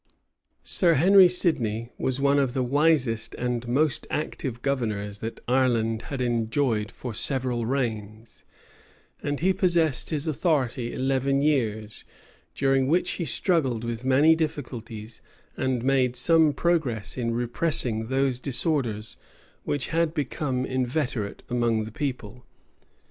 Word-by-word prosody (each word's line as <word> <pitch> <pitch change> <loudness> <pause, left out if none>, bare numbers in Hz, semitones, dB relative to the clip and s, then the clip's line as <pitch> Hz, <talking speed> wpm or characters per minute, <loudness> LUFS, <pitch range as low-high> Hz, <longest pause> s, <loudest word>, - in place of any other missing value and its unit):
[] - - -59 0.2
Sir 170 -4 +3
Henry 185 +5 +6
Sidney 120 - +1
was 130 0 -1
one 140 +1 +3
of 135 -2 0
the 130 - +1
wisest 135 -4 +1
and 120 -1 -3
most 135 +1 +1
active 130 -5 -4
governors 105 -7 -2
that 115 +1 -6
Ireland 115 -3 +1
had 135 -3 -4
enjoyed 115 -2 0
for 125 -1 -7
several 125 -1 +1
reigns;[] 110 -4 -4 0.8
and 145 0 -3
he 190 +2 +3
possessed 170 -7 +1
his 155 -1 -2
authority 135 -6 0
eleven 135 +1 0
years; 110 -8 -1 0.5
during 135 -1 +2
which 175 +4 +1
he 170 - -3
struggled 135 - 0
with 115 0 -4
many 140 +5 +4
difficulties, 120 -8 -5 0.3
and 130 -3 -1
made 130 -2 +2
some 160 +4 +4
progress 140 - -1
in 115 -2 -2
repressing 120 -2 0
those 130 -1 0
disorders 125 -6 0 0.5
which 145 -2 -2
had 165 0 0
become 135 -3 -2
inveterate 125 -5 -2
among 120 -2 0
the 110 - -8
people. 125 -3 -5
130 Hz, 125 wpm, -25 LUFS, 115-145 Hz, 0.8 s, Henry